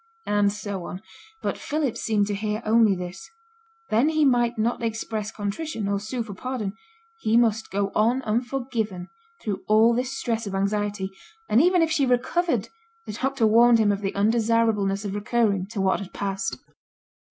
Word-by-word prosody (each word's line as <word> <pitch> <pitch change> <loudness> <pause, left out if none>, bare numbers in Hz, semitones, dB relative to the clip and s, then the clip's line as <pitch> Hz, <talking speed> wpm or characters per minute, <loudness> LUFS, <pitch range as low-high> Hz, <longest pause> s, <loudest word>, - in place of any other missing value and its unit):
And 205 -1 +2
so 200 -3 -5
on; 185 +3 -7 0.4
but - - -2
Philip 295 -5 -1
seemed 210 -2 +1
to 205 - -3
hear 210 +2 -2
only 220 -2 +4
this: 180 - -7 0.6
then 240 +8 +4
he 310 -1 +2
might 240 -3 +2
not 230 +3 0
express 225 -2 -3
contrition, 215 +3 -4
or 200 0 0
sue 230 +4 -3
for 215 -3 -8
pardon, 220 -1 -4 0.5
he 220 - +2
must 225 -2 +2
go 200 0 -1
on 240 +5 +2
unforgiven 230 -5 -2 0.3
through 205 -3 -3
all 220 +2 +5
this 250 +3 -2
stress 230 -4 -2
of 195 - -4
anxiety; 200 0 -1 0.4
and 220 +5 +4
even 355 +1 +4
if 320 - 0
she 290 -4 +2
recovered 295 +8 +1 0.4
the - - -6
doctor 265 +1 0
warned 230 +2 +6
him 215 -2 +3
of 200 0 -2
the 195 -1 -3
undesirableness 215 -2 +2
of 195 - -3
recurring 205 -3 0
to 210 0 -6
what 190 -1 +2
had 195 -1 -8
passed! 195 -1 -3
220 Hz, 170 wpm, -25 LUFS, 200-240 Hz, 0.6 s, warned